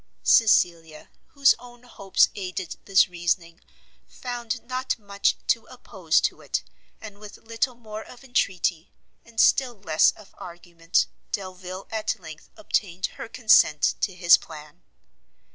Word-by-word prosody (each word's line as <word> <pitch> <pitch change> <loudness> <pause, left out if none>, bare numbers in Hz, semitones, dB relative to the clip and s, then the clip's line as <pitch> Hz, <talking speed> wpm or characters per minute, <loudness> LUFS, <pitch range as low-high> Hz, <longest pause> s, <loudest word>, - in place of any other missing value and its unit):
Cecilia, 170 -8 +2 0.2
whose 280 -2 +4
own 245 0 -15
hopes 200 -6 +1
aided 185 -3 -5
this 195 -1 +4
reasoning, 175 -1 -3 0.5
found 245 -1 -6
not 255 +1 -3
much 200 -2 0
to 230 - +1
oppose 190 -10 -1
to - - -2
it; - - -3 0.4
and 205 -2 -11
with 210 -1 -11
little 230 +3 -3
more 215 -2 -9
of 250 - -15
entreaty, 185 -9 -1 0.3
and 230 -1 -10
still 255 -3 +3
less 165 -6 +3
of 210 - -18
argument, 170 -1 -2 0.3
Delvile 185 -1 -6
at 220 0 -2
length 160 -3 -12
obtained 190 - -2
her - - -7
consent 220 -11 +4
to 190 - -1
his 175 -2 +6
plan. 150 -2 -13
200 Hz, 130 wpm, -24 LUFS, 175-230 Hz, 0.5 s, his